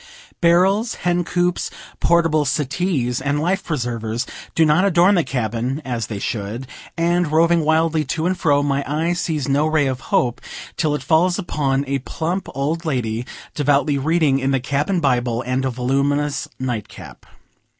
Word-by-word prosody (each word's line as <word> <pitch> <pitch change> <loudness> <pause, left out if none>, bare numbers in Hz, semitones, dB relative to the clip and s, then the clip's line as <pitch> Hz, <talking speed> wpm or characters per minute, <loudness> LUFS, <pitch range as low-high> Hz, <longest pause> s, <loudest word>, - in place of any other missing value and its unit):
Barrels, 190 +7 +3
hen 175 0 +2
coops, 175 +1 0 0.3
portable 165 -3 +3
settees, 140 -3 -1
and 145 +2 0
life 185 +5 0
preservers 120 -5 -2 0.3
do 165 - +4
not 155 +4 +4
adorn 185 0 +4
the 175 -4 +3
cabin, 120 +1 -2
as 120 -4 -3
they 105 - -5
should; 105 +4 -4 0.3
and, 170 -1 +1
roving 165 +1 +3
wildly 160 0 +2
to 160 +4 -2
and 185 +1 +1
fro, 145 -5 +2
my 140 -1 0
eye 160 +4 0
sees 160 -5 -2
no 145 +2 +2
ray 155 -2 +2
of 130 -1 -2
hope 120 -1 +1 0.3
till 155 -3 0
it - - -5
falls 175 +3 +3
upon 140 -7 -1
a 135 0 -1
plump 170 +8 -3
old 150 +5 -1
lady, 125 -6 -2 0.3
devoutly 145 0 +2
reading 155 -2 +2
in 135 0 0
the 135 -1 +2
cabin 145 +8 -1
Bible, 125 -3 +1
and 130 +1 -1
a - - +1
voluminous 140 +4 0
night 120 -5 -3
cap. - - -13
145 Hz, 160 wpm, -20 LUFS, 130-170 Hz, 0.3 s, do